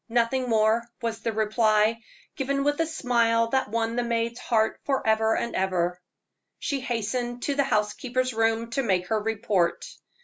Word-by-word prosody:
"Nothing 245 Hz, +2 st, +1 dB
more," 225 Hz, +1 st, +2 dB, 0.2 s
was 230 Hz, -1 st, -2 dB
the 225 Hz, 0 st, -2 dB
reply, 215 Hz, 0 st, +2 dB, 0.3 s
given 275 Hz, +1 st, -1 dB
with 290 Hz, +2 st, +1 dB
a 325 Hz, -, +1 dB
smile 230 Hz, -6 st, +1 dB
that 265 Hz, -2 st, 0 dB
won 230 Hz, +1 st, -1 dB
the 245 Hz, -, +1 dB
maid's 235 Hz, 0 st, -1 dB
heart 220 Hz, -2 st, +1 dB
forever 220 Hz, -5 st, +1 dB
and 235 Hz, -, -3 dB
ever. 180 Hz, -2 st, 0 dB, 0.6 s
She 280 Hz, -, -2 dB
hastened 240 Hz, 0 st, -3 dB
to 285 Hz, -, 0 dB
the 280 Hz, 0 st, +2 dB
housekeeper's 250 Hz, +3 st, -1 dB
room 225 Hz, +1 st, 0 dB
to 275 Hz, -, 0 dB
make 185 Hz, -6 st, 0 dB
her 220 Hz, -1 st, +2 dB
report. 210 Hz, -5 st, 0 dB
230 Hz, 160 wpm, -26 LUFS, 220-245 Hz, 0.6 s, more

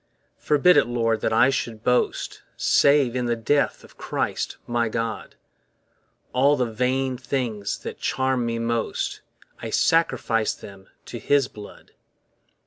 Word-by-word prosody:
Forbid 150 Hz, +3 st, +4 dB
it, 145 Hz, -, +4 dB
Lord, 115 Hz, -2 st, 0 dB
that -, -, 0 dB
I 120 Hz, +4 st, +4 dB
should 115 Hz, -4 st, -4 dB
boast 125 Hz, 0 st, 0 dB, 0.2 s
Save 140 Hz, -4 st, +3 dB
in 125 Hz, -1 st, -1 dB
the 120 Hz, -, +1 dB
death 140 Hz, +6 st, 0 dB
of -, -, -18 dB
Christ -, -, -3 dB
my 120 Hz, -1 st, 0 dB
God; 115 Hz, 0 st, -4 dB, 1.0 s
All 140 Hz, +3 st, +4 dB
the 125 Hz, -, +1 dB
vain 125 Hz, +3 st, -1 dB
things 120 Hz, -6 st, -3 dB
that -, -, -8 dB
charm 130 Hz, -1 st, 0 dB
me 115 Hz, 0 st, -2 dB
most, 115 Hz, 0 st, -2 dB, 0.4 s
I -, -, -5 dB
sacrifice 115 Hz, -9 st, +1 dB
them 95 Hz, -1 st, -13 dB, 0.2 s
to -, -, -7 dB
his 140 Hz, -3 st, +2 dB
blood. 105 Hz, -2 st, -13 dB
120 Hz, 135 wpm, -24 LUFS, 115-135 Hz, 1.0 s, Forbid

